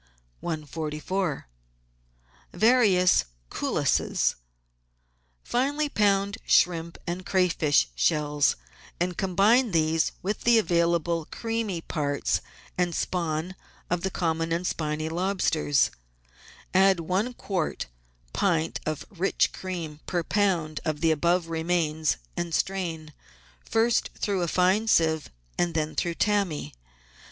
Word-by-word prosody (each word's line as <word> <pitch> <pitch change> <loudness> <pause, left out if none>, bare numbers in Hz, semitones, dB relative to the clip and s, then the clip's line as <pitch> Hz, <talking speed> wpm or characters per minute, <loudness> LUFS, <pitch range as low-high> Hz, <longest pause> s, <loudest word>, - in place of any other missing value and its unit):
144 155 - -3 1.1
VARIOUS 210 - +4 0.3
CULLISES - - +1 1.1
Finely 290 +4 0
pound 200 -2 +1
shrimp 170 -1 +2
and 175 +2 -4
crayfish 165 - +2
shells, 145 - +2 0.4
and 175 +1 -1
combine 195 +8 +3
with 205 - -8
these 160 0 +2 0.3
the 235 -1 +5
available 170 -3 +1
creamy 225 -6 -3
parts 145 -3 -1 0.4
and 175 -2 +1
spawn 170 0 -2 0.4
of 175 -1 +1
the 190 - -1
common 165 -2 -1
and 170 +2 -1
spiny 155 -2 -2
lobsters; 165 -5 +1 0.8
add 190 -1 +5
one 190 +9 0
quarter 185 -9 -2 0.5
pint 165 -5 0
of 155 -2 -3
rich 195 0 +1
cream 170 -5 -5
per 175 -2 -1
lb. 170 -6 0
of 155 -3 -2
the 165 -1 +4
above 170 +3 +1
remains, 160 -2 0 0.2
and 170 -2 -2
strain, 165 -5 -2 0.5
first 225 +1 +1
through 200 -3 -1
a 175 - 0
fine 185 +6 +2
sieve 160 -6 +2 0.3
and 170 -2 +1
then 155 -1 -1
through 170 -1 -1
tammy. 195 - 0
170 Hz, 110 wpm, -26 LUFS, 160-195 Hz, 1.1 s, the